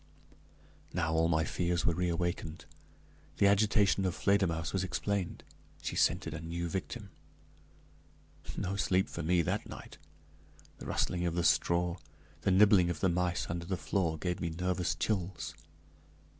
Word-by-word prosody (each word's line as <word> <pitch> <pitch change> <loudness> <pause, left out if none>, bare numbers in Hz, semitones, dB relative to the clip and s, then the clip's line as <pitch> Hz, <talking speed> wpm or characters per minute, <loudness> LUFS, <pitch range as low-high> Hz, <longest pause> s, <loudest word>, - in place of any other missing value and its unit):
Now, 80 -2 0
all 80 0 +3
my 80 -1 +2
fears 85 +1 -1
were 85 - +3
reawakened; 85 -2 -2 0.7
the - - +4
agitation 100 -3 +4
of 90 -1 0
Fledermausse 90 -4 +1
was 95 -1 0
explained 95 0 -2 0.4
she - - -3
scented - - +2
a 80 - -5
new 85 +1 -3
victim. 95 +3 -5 1.5
No 100 -1 -2
sleep 95 -1 +2
for - - -5
me 85 +2 +2
that - - -2
night; - - -10 0.8
the - - -8
rustling 90 0 0
of 85 - -2
the 85 - +1
straw, 85 +1 +2 0.4
the - - +1
nibbling 95 -2 +6
of 85 -3 -3
the 95 - +2
mice 90 0 0
under 85 0 -4
the 95 +1 -2
floor, 85 -6 0
gave 90 +2 -2
me 85 - -1
nervous 90 +1 -1
chills. 95 -6 -2
90 Hz, 145 wpm, -32 LUFS, 85-95 Hz, 1.5 s, nibbling